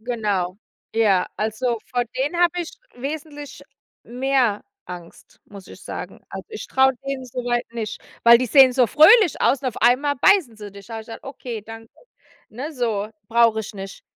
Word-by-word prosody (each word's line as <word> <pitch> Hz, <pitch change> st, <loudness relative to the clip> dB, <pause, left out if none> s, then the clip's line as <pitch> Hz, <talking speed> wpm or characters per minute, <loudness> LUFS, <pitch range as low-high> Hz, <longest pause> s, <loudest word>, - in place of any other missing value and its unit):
Genau. 205 Hz, -6 st, -2 dB, 0.4 s
Ja, 205 Hz, -5 st, +3 dB
also, 225 Hz, +2 st, -2 dB
vor 245 Hz, -1 st, 0 dB
denen 290 Hz, +6 st, -1 dB
habe 350 Hz, 0 st, +2 dB
ich 340 Hz, -, -5 dB, 0.2 s
wesentlich 290 Hz, +2 st, -7 dB, 0.4 s
mehr 250 Hz, -3 st, 0 dB, 0.2 s
Angst, 175 Hz, -2 st, -12 dB
muss 200 Hz, -2 st, -13 dB
ich -, -, -13 dB
sagen. -, -, -8 dB
Also, -, -, -8 dB
ich 435 Hz, -, -7 dB
traue 265 Hz, 0 st, +3 dB
denen 270 Hz, -2 st, -4 dB
so 250 Hz, +1 st, -5 dB
weit 240 Hz, 0 st, -1 dB
nicht, 220 Hz, -2 st, -5 dB, 0.2 s
weil 235 Hz, 0 st, +8 dB
die 255 Hz, -, -1 dB
sehen 265 Hz, +2 st, +6 dB
so 250 Hz, -1 st, +3 dB
fröhlich 335 Hz, -, +6 dB
aus 250 Hz, +4 st, +2 dB
und 255 Hz, -, 0 dB
auf 235 Hz, -, -8 dB
einmal 265 Hz, +5 st, +3 dB
beißen 290 Hz, -, +3 dB
sie 210 Hz, -2 st, -10 dB
dich. 200 Hz, 0 st, -13 dB
Sage 225 Hz, -1 st, -6 dB
ich -, -, -21 dB
dann: 225 Hz, -, -8 dB
„Okay, 245 Hz, -6 st, -7 dB
danke.“ 225 Hz, +1 st, -11 dB, 0.6 s
Ne, 270 Hz, +8 st, -7 dB
so: 220 Hz, -6 st, -2 dB, 0.2 s
„Brauche 230 Hz, -1 st, +3 dB
ich 210 Hz, -1 st, -9 dB
nicht.“, 195 Hz, 0 st, -9 dB
240 Hz, 180 wpm, -22 LUFS, 215-270 Hz, 0.6 s, weil